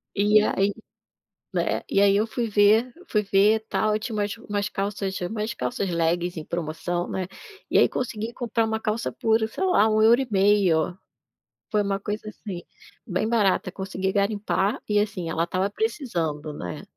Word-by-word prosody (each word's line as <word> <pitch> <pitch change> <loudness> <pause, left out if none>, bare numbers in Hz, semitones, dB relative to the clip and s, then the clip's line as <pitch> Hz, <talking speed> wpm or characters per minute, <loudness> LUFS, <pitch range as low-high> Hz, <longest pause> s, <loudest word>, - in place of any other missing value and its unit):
E 210 +1 +5
aí 200 -1 +1 0.8
né, - - 0
e 195 - +2
aí 200 0 +5
eu 210 - +3
fui 235 +1 -2
ver 215 +4 +4 0.2
fui 210 -1 +2
ver 200 +3 +4
tal, 215 0 +1
e - - 0
tinha 220 0 -5
umas 205 +1 -1
umas 205 -2 -3
calças 195 -1 -3
umas 215 +4 -2
calças 200 -6 -2
leggings 170 +1 0
em 155 - -8
promoção, 175 +1 -3
né, 185 -1 -3 0.4
e - - +3
aí - - +5
consegui 230 -2 -3
comprar 230 -2 -1
uma 220 0 -1
calça 220 +2 -2
por, 220 0 +2
sei 380 - -4
lá, 220 - +4
$1,50. 205 - +3 0.7
Foi 210 -2 +2
uma 200 -1 -1
coisa, 210 +2 -4
assim, 190 -5 -7 0.4
bem 205 0 -1
barata, 200 -5 +2
consegui 190 0 -3
garimpar 205 +2 0
e, 210 - +1
assim, 195 -5 -2
ela 165 +1 0
estava 185 +3 -1
precisando, 175 - -2
né. 90 -10 -6
205 Hz, 165 wpm, -25 LUFS, 185-220 Hz, 0.8 s, E